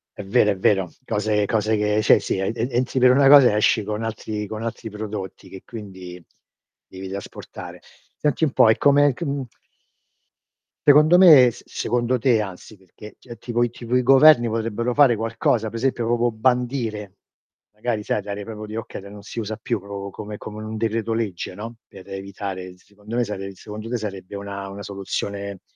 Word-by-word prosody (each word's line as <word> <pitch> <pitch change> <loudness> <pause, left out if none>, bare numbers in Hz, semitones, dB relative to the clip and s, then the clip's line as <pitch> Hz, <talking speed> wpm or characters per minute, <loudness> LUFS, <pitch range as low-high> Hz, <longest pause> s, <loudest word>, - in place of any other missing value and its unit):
È - - -7
vero, 105 +1 +3
è 100 - -2
vero. 95 -2 +2 0.2
Cose 105 -1 0
cose 110 +1 +1
che 105 +1 +1
cioè - - +6
sì 100 - -2
ed 95 +4 -2
ed 120 +3 -1
entri 125 +2 0
per 125 0 +6
una 135 +1 +5
cosa 140 -3 +9
e 105 - 0
esci 105 +1 +3
con 105 +2 -4
altri 110 -1 -4
con 110 +2 -6
altri 115 0 -5
prodotti 105 -2 -7
che, 95 - -11
quindi, 95 -5 -10 0.6
devi 95 0 -9
trasportare. 100 0 -9 0.4
Senti 150 +2 0
un 140 - 0
po' 115 - +5
e 110 - +4
come 145 -1 +4
c - - -5
mhmm 140 -1 -2 1.4
Secondo 150 +4 +7
me 155 -9 +8
s - - -14
secondo 120 +2 -1
te, 120 -2 +3
anzi, 100 +1 -7
perché 95 +3 -14
c 120 -2 -12
tipo 120 +1 -2
i 120 - +1
tipo 120 +1 -5
i 125 - +4
governi 135 -1 +6
potrebbero 115 +2 -2
fare 140 -4 +5
qualcosa? 115 0 0
Per 115 - -7
esempio 120 -1 -1
proprio 120 0 +1
bandire, 115 -4 -1 0.6
magari 110 0 -2
sai 105 - -1
dare 100 0 -6
proprio 110 0 -8
di 105 - -9
okay 115 -2 -6
de 100 - -12
non 100 0 -11
si 115 - -9
usa 110 0 -3
più 115 - -2
proprio 100 0 -7
come 105 +1 -8
come 105 0 -8
in - - -7
un 110 - -5
decreto 115 0 -1
legge, 105 -6 -3
no? 115 +4 -8
Per 95 0 -14
evitare 95 -1 -6
s 90 - -26
secondo 105 +2 -11
me 120 - +2
sare 100 -3 -5
secondo 105 +3 -9
te 125 - -1
sarebbe 100 -4 -7
una 100 -1 -6
una 100 +1 -8
soluzione, 100 0 -5
110 Hz, 195 wpm, -22 LUFS, 100-120 Hz, 1.4 s, cosa